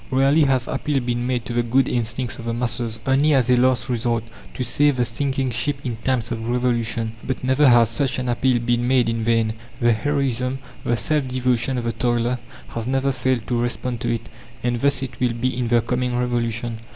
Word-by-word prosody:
Rarely 135 Hz, +4 st, +4 dB
has 130 Hz, -3 st, +1 dB
appeal 140 Hz, +1 st, -1 dB
been 120 Hz, -1 st, -2 dB
made 125 Hz, -2 st, -1 dB
to 120 Hz, -, -4 dB
the 120 Hz, -, +2 dB
good 125 Hz, +3 st, +2 dB
instincts 120 Hz, +1 st, -2 dB
of 115 Hz, -, -7 dB
the 115 Hz, 0 st, -2 dB
masses 115 Hz, -1 st, -2 dB
only 140 Hz, +3 st, +3 dB
as 125 Hz, -2 st, +3 dB
a -, -, +6 dB
last 125 Hz, -1 st, +2 dB
resort, 120 Hz, -2 st, 0 dB, 0.3 s
to 130 Hz, -, -2 dB
save 145 Hz, +2 st, +2 dB
the 125 Hz, -1 st, +1 dB
sinking 130 Hz, +2 st, -1 dB
ship 135 Hz, +5 st, 0 dB
in 120 Hz, -3 st, -2 dB
times 120 Hz, -1 st, -1 dB
of 115 Hz, 0 st, -3 dB
revolution 120 Hz, -2 st, 0 dB
but 130 Hz, -, -3 dB
never 130 Hz, +3 st, +4 dB
has 120 Hz, -1 st, +6 dB
such 135 Hz, +3 st, -1 dB
an 130 Hz, 0 st, -3 dB
appeal 125 Hz, +1 st, +2 dB
been 120 Hz, 0 st, 0 dB
made 125 Hz, -2 st, +3 dB
in 115 Hz, -1 st, -1 dB
vain; 115 Hz, -1 st, +2 dB, 0.3 s
the 120 Hz, -2 st, +4 dB
heroism, 130 Hz, 0 st, 0 dB, 0.3 s
the 120 Hz, -, +1 dB
self 150 Hz, +1 st, 0 dB
devotion 125 Hz, 0 st, 0 dB
of 120 Hz, -, -2 dB
the 115 Hz, -, 0 dB
toiler 120 Hz, 0 st, 0 dB, 0.3 s
has 115 Hz, -, -4 dB
never 135 Hz, +1 st, +1 dB
failed 130 Hz, -3 st, -1 dB
to 125 Hz, -, -1 dB
respond 120 Hz, 0 st, -2 dB
to 120 Hz, -, 0 dB
it. 115 Hz, 0 st, -3 dB, 0.4 s
And 120 Hz, -1 st, 0 dB
thus 140 Hz, -2 st, +2 dB
it 130 Hz, -, -7 dB
will 125 Hz, -2 st, +1 dB
be 125 Hz, +2 st, -1 dB
in 125 Hz, -1 st, -1 dB
the 120 Hz, 0 st, +3 dB
coming 125 Hz, +1 st, -1 dB
Revolution. 120 Hz, -2 st, -1 dB
125 Hz, 210 wpm, -22 LUFS, 120-130 Hz, 0.4 s, a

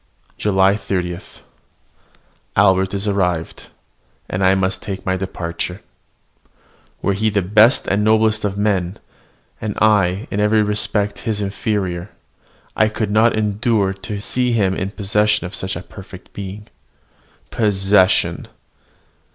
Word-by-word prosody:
JULY 95 Hz, -1 st, +3 dB
30. 90 Hz, -4 st, -3 dB, 1.4 s
Albert 95 Hz, -1 st, +3 dB
is 100 Hz, +2 st, -2 dB
arrived, 90 Hz, -5 st, -1 dB, 0.6 s
and 95 Hz, +1 st, -2 dB
I 95 Hz, +1 st, +5 dB
must 95 Hz, 0 st, -1 dB
take 100 Hz, 0 st, -6 dB
my 95 Hz, -1 st, +1 dB
departure. 90 Hz, 0 st, -4 dB, 1.2 s
Were 100 Hz, -, +2 dB
he 110 Hz, +3 st, 0 dB
the 100 Hz, -2 st, 0 dB
best 110 Hz, +7 st, +4 dB
and 100 Hz, +1 st, 0 dB
noblest 110 Hz, 0 st, +2 dB
of 100 Hz, -1 st, -2 dB
men, 100 Hz, -2 st, 0 dB, 0.6 s
and 105 Hz, -2 st, -3 dB
I 100 Hz, -2 st, +2 dB
in 100 Hz, -, -2 dB
every 105 Hz, +1 st, +3 dB
respect 105 Hz, 0 st, 0 dB
his 110 Hz, -3 st, -2 dB
inferior, 100 Hz, -2 st, -2 dB, 0.7 s
I 110 Hz, -, +3 dB
could 110 Hz, -1 st, -3 dB
not 110 Hz, +2 st, +4 dB
endure 105 Hz, -1 st, 0 dB
to 100 Hz, +2 st, -6 dB
see 125 Hz, +3 st, 0 dB
him 100 Hz, -5 st, +2 dB
in 95 Hz, 0 st, -3 dB
possession 105 Hz, 0 st, +1 dB
of 90 Hz, -, -7 dB
such 95 Hz, 0 st, -2 dB
a 85 Hz, -, -6 dB
perfect 95 Hz, -1 st, -13 dB
being. 100 Hz, +1 st, -8 dB, 0.8 s
Possession! 95 Hz, -3 st, +2 dB
100 Hz, 125 wpm, -19 LUFS, 95-105 Hz, 1.4 s, I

